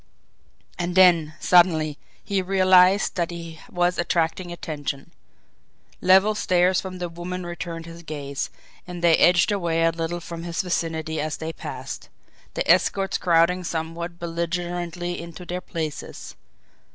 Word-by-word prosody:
And 175 0 -2
then, 170 -5 +5
suddenly, 160 -4 +4 0.2
he 200 -2 0
realised 185 +1 +4
that 170 -2 0
he 165 -2 -8
was 175 0 +1
attracting 175 +1 0
attention. 145 -5 -5 0.9
Level 190 +3 +5
stares 185 -3 +2
from 185 -1 -7
the 180 -1 -3
women 175 +2 -6
returned 170 -1 -6
his 170 0 -10
gaze, 140 -3 -4 0.4
and 175 -1 -7
they 170 -2 +6
edged 175 +3 +5
away 170 -5 0
a 165 - +4
little 165 +1 -3
from 170 0 -7
his 170 +1 -2
vicinity 160 -3 -2
as 155 0 -3
they 160 0 -5
passed, - - -7 0.5
their - - 0
escorts 195 -1 +2
crowding 175 +1 +3
somewhat 170 +1 -4
belligerently 175 +1 -3
into 170 +1 -9
their 180 +1 -4
places. 160 -4 -6
175 Hz, 135 wpm, -24 LUFS, 165-180 Hz, 0.9 s, they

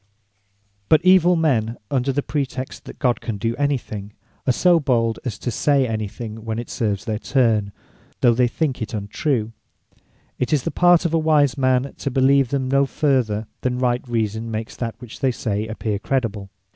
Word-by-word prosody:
But 155 +3 +4
evill 180 -1 +6
men 120 -9 +1
under 135 0 +1
pretext 135 -2 -4
that - - -10
God 125 -4 +1
can 110 -3 -4
do 115 +3 -1
any 145 -1 +1
thing, 105 -3 -8 0.3
are - - +5
so 175 +6 +4
bold 115 -6 +1
as 115 -6 -4
to 120 - -3
say 140 +3 +2
any 110 -2 -2
thing 110 +1 -8
when 110 -1 -3
it 120 - -6
serves 105 -4 -1
their 110 -1 -2
turn, 115 -6 +1 0.5
though 120 -2 +5
they 125 +1 +3
think 135 0 -2
it 110 - -4
untrue; 110 +3 -1 0.9
It 125 - -1
is 145 -4 +2
the - - -2
part 175 -1 +4
of 165 - 0
a 165 - +3
wise 150 -4 +3
man, 130 0 +1
to 140 - -2
believe 135 0 +3
them 135 -1 -1
no 140 +1 +3
further, 130 -8 0 0.2
than 125 -1 -1
right 125 -1 +1
reason 110 -1 -2
makes 110 0 -5
that 115 -2 -3
which 125 -2 -11
they 135 - +2
say, 110 -3 -2
appear 110 -2 -3
credible. 110 -6 -2
125 Hz, 185 wpm, -21 LUFS, 110-140 Hz, 0.9 s, evill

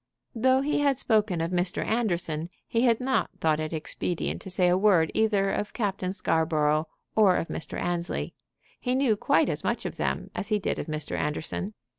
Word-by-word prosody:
Though 260 +3 +3
he 295 +1 0
had 280 -2 +2
spoken 215 -8 +1
of 165 +2 -2
Mr. 180 0 0
Anderson, 175 -8 -1 0.2
he 230 - +1
had 230 -2 +3
not 260 +1 +1
thought 155 -1 +2
it 155 0 -3
expedient 165 +2 -2
to - - -8
say 180 -1 +2
a 175 - +4
word 185 -5 +4
either 205 -3 +2
of 210 - -3
Captain 195 -5 -1
Scarborough 155 -4 +1 0.3
or 205 -4 +5
of 165 - -2
Mr. - - -4
Annesley. 175 0 -2 0.5
He 250 0 0
knew 260 -5 +3
quite - - +2
as - - -2
much - - -1
of - - -4
them - - -2
as 200 - -3
he 215 -1 +2
did 200 - -2
of - - -4
Mr. 155 -1 -3
Anderson. 160 +7 -3
190 Hz, 190 wpm, -27 LUFS, 165-220 Hz, 0.5 s, or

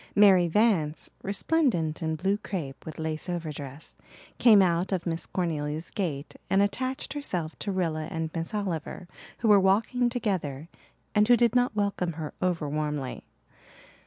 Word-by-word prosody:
Mary 195 -4 +6
Vance, 170 -5 +1
resplendent 200 - 0
in 160 -1 -1
blue 195 +5 +1
crepe, 165 -11 -6
with 160 - -7
lace 160 +2 -4
overdress, 155 -4 -5 0.4
came 220 -4 +7
out 180 0 +2
of 185 -3 -1
Miss 165 -1 -3
Cornelia's 155 -3 -2
gate 155 -7 -3
and 195 - +3
attached 260 +6 -2
herself 180 - -3
to 200 - -2
Rilla 165 -4 -1
and 160 0 -4
Miss 165 -1 -3
Oliver 185 -4 -3 0.3
who 230 - +1
were 205 -2 +7
walking 225 +6 +2
together 175 - -2 0.4
and 210 0 +4
who 245 0 +6
did 235 -2 +3
not 245 -2 +2
welcome 200 -4 0
her 155 -1 -6
over 175 -4 0
warmly. 150 -2 -3
175 Hz, 150 wpm, -27 LUFS, 155-205 Hz, 0.4 s, came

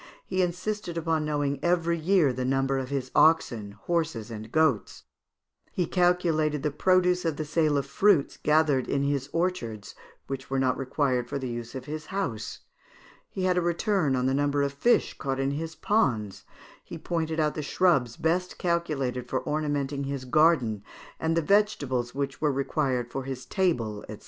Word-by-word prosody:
He 185 - 0
insisted 180 0 -2
upon 160 -2 0
knowing 145 -2 -1
every 170 -1 +2
year 165 -5 +3
the 130 +1 -3
number 135 +1 +1
of 130 -1 -5
his 135 -2 -3
oxen, 120 -10 +3
horses, 130 -2 -2
and 110 0 -8
goats; 155 -9 +1 0.7
he 180 - 0
calculated 165 -5 +1
the 150 - 0
produce 180 +3 +2
of 160 -3 -1
the 155 - -3
sale 155 -1 +1
of 140 - -1
fruits 160 +1 +3
gathered 150 -4 +2
in 140 0 0
his 140 -1 -1
orchards, 165 - -2 0.3
which 135 -1 -6
were 135 - -1
not 130 -1 +2
required 130 -2 -1
for - - -2
the 130 -2 -4
use 120 +1 -6
of 130 -1 -6
his 155 +1 -6
house; 150 - -4 0.7
he 190 - -4
had 180 -1 +2
a - - 0
return 175 -3 +1
of 125 0 0
the 130 - +2
number 145 0 +1
of 140 0 -1
fish 235 +12 +2
caught 135 -1 -2
in 135 0 0
his 160 +3 -4
ponds; 115 - 0 0.4
he - - -8
pointed 160 -1 -2
out 150 -1 +2
the 155 - -4
shrubs 145 -7 +2
best 180 +3 0
calculated 145 -8 -1
for 130 - -2
ornamenting 145 -2 -1
his 135 -1 -4
garden, 130 -7 +3 0.4
and 160 +1 0
the 165 - +2
vegetables 145 - +1
which 140 -1 -3
were 150 -2 +3
required 135 -3 -1
for 135 - -3
his 130 -2 -6
table, 120 - -1
&c. 110 - -6
145 Hz, 175 wpm, -27 LUFS, 130-170 Hz, 0.7 s, year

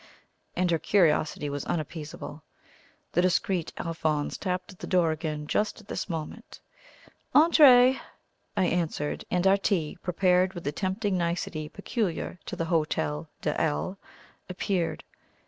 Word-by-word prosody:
and 180 -1 +1
her 165 - +2
curiosity 155 -4 +2
was 145 0 -3
unappeasable. 155 -1 -5 0.7
The 175 - +3
discreet 180 -1 +1
Alphonse 155 -3 -1
tapped 185 0 -3
at 185 - -16
the - - -6
door 175 -3 +3
again 155 -1 -3
just 210 +9 0
at 210 - -17
this - - -4
moment. 160 -3 -6 0.8
"Entrez!" 265 -5 +7 0.6
I 185 - +3
answered; 165 -4 -1
and 180 +1 +1
our 195 +1 +6
tea, 180 -6 -1
prepared 180 +1 +2
with 175 - -6
the 145 - -1
tempting 190 +3 -1
nicety 170 -2 -2
peculiar 200 -3 -3
to - - -4
the 165 - -2
Hotel 80 - -1
de - - 0
L, 75 - -1 0.5
appeared. 180 -1 -1
175 Hz, 135 wpm, -27 LUFS, 155-190 Hz, 0.8 s, Entrez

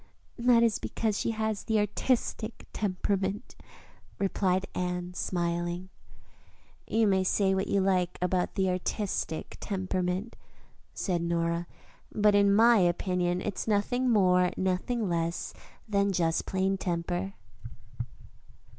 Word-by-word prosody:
'" - - -27
"That 235 -1 +6
is 225 -2 +2
because 220 -3 -1
she - - 0
has 220 -2 -2
the 220 - +1
artistic 220 +1 -1
temperament," 195 +1 -2 0.6
replied 190 -1 +1
Anne, 180 0 -3
smiling. 175 0 -2 1.0
"You 225 0 +2
may 190 -2 +3
say 190 +1 +2
what 190 0 0
you 200 - +2
like 185 -2 +1
about 180 0 0
the 190 -1 +1
artistic 180 -2 -3
temperament," 185 +2 -2 0.6
said 175 -4 -1
Nora, 170 0 -1 0.4
"but 210 0 +3
in 200 0 +5
my 230 +3 +6
opinion 180 0 +1
it's 205 +2 -3
nothing 245 +5 +1
more 180 -5 +4
nor 185 -1 +1
less 175 -9 -1 0.3
than 200 -1 +2
just 165 -3 0
plain 190 0 0
temper." 175 +2 -2
190 Hz, 120 wpm, -29 LUFS, 180-210 Hz, 1.0 s, That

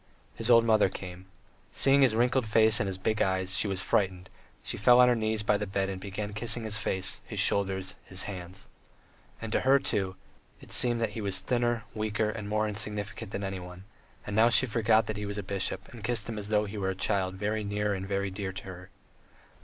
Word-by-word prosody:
His 115 +6 -2
old 115 -1 +7
mother 110 -4 +4
came. 95 0 -9 0.4
Seeing 140 +1 +4
his 125 -5 +4
wrinkled 125 +1 +2
face 110 0 +5
and 100 - 0
his 95 -1 -3
big 110 +3 -1
eyes, 95 0 0
she 100 - 0
was 95 -2 -2
frightened, 95 -1 0 0.3
she - - -4
fell 120 +4 +5
on 125 - +8
her 125 - +4
knees 110 -1 -1
by 105 0 +2
the 105 - -3
bed 95 0 -1
and 95 -1 -5
began 105 +1 -5
kissing 115 +2 0
his 110 -1 -2
face, 95 -3 -1
his - - -6
shoulders, 95 -1 +1
his 95 0 -5
hands. 95 -1 -8 0.7
And 115 -1 -6
to - - +2
her, 135 +1 +5
too, 95 -8 -1 0.4
it - - -13
seemed 120 -1 +2
that 110 -2 0
he 110 - -5
was 100 -2 0
thinner, 120 -1 0
weaker, 110 0 -1
and 105 -2 -6
more 110 0 +1
insignificant 105 +1 -5
than 100 - -4
anyone, 90 -1 -6 0.4
and 105 - -4
now 115 +2 +5
she 125 - +4
forgot 110 -2 +2
that 110 -1 -4
he 105 0 -4
was 100 0 -5
a 105 - -3
bishop, 95 0 -3
and 115 -3 -10
kissed 115 -2 +1
him 115 -2 -4
as 100 - -5
though 105 -1 +2
he 105 +1 -6
were 95 -1 -1
a 95 - -2
child 95 -1 -1
very 105 +2 -2
near 105 0 -1
and 95 0 -4
very 100 0 -1
dear 95 0 -4
to - - -7
her. 90 0 -10
105 Hz, 225 wpm, -29 LUFS, 95-110 Hz, 0.7 s, on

